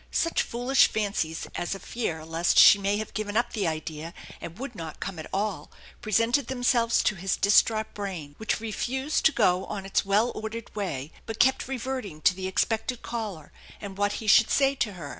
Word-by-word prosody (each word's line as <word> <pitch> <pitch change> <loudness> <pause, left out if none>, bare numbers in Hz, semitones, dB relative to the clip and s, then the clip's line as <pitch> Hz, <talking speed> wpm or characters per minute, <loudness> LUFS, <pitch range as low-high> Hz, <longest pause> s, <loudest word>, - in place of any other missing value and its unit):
Such 335 - +1
foolish 245 +3 +3
fancies 200 -7 -2
as 175 - -3
a - - -8
featf 165 -11 -4
lest 165 +1 +1
she 200 - +9
might 200 +1 0
have 215 0 -5
given 215 0 -2
up 240 - 0
the 205 -6 -1
idea 160 +1 -5 0.3
and 170 +2 -8
would 270 0 -6
not 165 -6 -8
come 180 -3 -5
at 155 - -7
all 195 -6 -2 0.3
presented 230 +5 +1
themselves 245 -2 +2
to - - +2
his 190 0 -2
distraught 215 +2 +3
brain, 185 -8 -6
which 220 - -1
refused 260 +6 -2
to 320 - +7
go 185 -8 +2
on 200 -2 -5
its 195 - +1
well 205 +5 +2
ordered 220 +1 -7
way, 160 -8 -4 0.2
but 225 0 -6
kept 265 0 +3
reverting 255 -9 -4
to 185 - +4
the 185 0 -5
ex* 190 - +2
pected 230 +2 -3
caller 210 -10 -5 0.3
and 200 -2 -8
what 205 0 +1
he 220 - -6
should 220 +1 +6
say 275 -1 +3
to 235 -6 -2
her. 165 -6 -8
210 Hz, 195 wpm, -26 LUFS, 180-235 Hz, 0.3 s, she